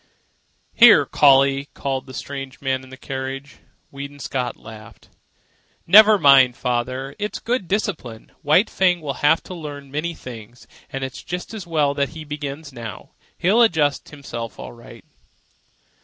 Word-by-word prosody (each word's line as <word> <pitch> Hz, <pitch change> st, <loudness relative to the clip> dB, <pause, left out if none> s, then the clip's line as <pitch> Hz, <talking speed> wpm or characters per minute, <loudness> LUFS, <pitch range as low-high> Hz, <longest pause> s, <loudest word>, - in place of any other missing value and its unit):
"Here, -, -, +7 dB
Collie!" 140 Hz, 0 st, +4 dB
called 135 Hz, -1 st, -3 dB
the 130 Hz, -, -10 dB
strange 135 Hz, -2 st, -7 dB
man 130 Hz, -1 st, -2 dB
in 130 Hz, -, -14 dB
the 130 Hz, -, -11 dB
carriage. 135 Hz, +1 st, -6 dB, 0.3 s
Weedon 140 Hz, +1 st, -8 dB
Scott 125 Hz, -3 st, -4 dB
laughed. 110 Hz, -1 st, -14 dB, 0.8 s
"Never 215 Hz, +4 st, +8 dB
mind, 135 Hz, -6 st, +5 dB
father. 130 Hz, +3 st, -3 dB
It 210 Hz, 0 st, -3 dB
is -, -, -4 dB
good 235 Hz, -5 st, -2 dB
discipline. 140 Hz, -, -3 dB
White 160 Hz, +7 st, +3 dB
Fang 180 Hz, -2 st, +1 dB
will 145 Hz, -3 st, -3 dB
have 150 Hz, +2 st, +3 dB
to -, -, -9 dB
learn 145 Hz, -5 st, -8 dB
many 160 Hz, +4 st, -3 dB
things, 120 Hz, -2 st, -11 dB, 0.2 s
and 135 Hz, 0 st, -5 dB
it's 130 Hz, -1 st, -6 dB
just 180 Hz, +4 st, -6 dB
as 205 Hz, -5 st, -7 dB
well 150 Hz, -4 st, +1 dB
that 140 Hz, -1 st, -1 dB
he 155 Hz, -, -7 dB
begins 145 Hz, 0 st, -7 dB
now. 115 Hz, -4 st, -9 dB, 0.3 s
He'll 205 Hz, +7 st, +3 dB
adjust 160 Hz, -10 st, +2 dB
himself 120 Hz, -6 st, -8 dB
all -, -, -8 dB
right." 120 Hz, -1 st, -15 dB
140 Hz, 155 wpm, -21 LUFS, 130-160 Hz, 0.8 s, Never